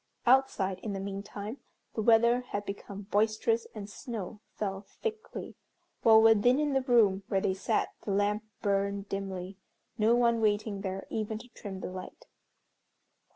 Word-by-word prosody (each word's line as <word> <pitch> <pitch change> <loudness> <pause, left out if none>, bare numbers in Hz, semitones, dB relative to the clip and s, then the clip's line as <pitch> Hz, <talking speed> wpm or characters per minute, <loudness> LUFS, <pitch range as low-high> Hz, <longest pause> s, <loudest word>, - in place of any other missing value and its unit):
Outside, 235 -7 +3
in 210 - -4
the 195 - -3
meantime, 200 +4 -6 0.3
the 220 - -1
weather 235 +2 +5
had 205 0 -3
become 200 0 -6
boisterous 220 +3 +1
and 205 -2 -6
snow 210 -1 -6 0.2
fell 195 -2 -3 0.2
thickly, 445 -1 -4 0.5
while 220 -1 +8
within 225 +3 +5
in 295 -2 +1
the 270 - +3
room 225 -7 +4
where 195 - +1
they 190 - +1
sat 190 - 0
the - - -5
lamp 205 +2 +1 0.2
burned 200 0 0
dimly, 195 -1 -5 0.4
no 220 +2 +5
one 235 -1 +3
waiting 210 -1 +1
there 195 0 -4
even 215 0 -2
to 245 - -11
trim 195 -4 -8
the - - -5
light. 185 - -9
210 Hz, 155 wpm, -30 LUFS, 195-230 Hz, 0.5 s, while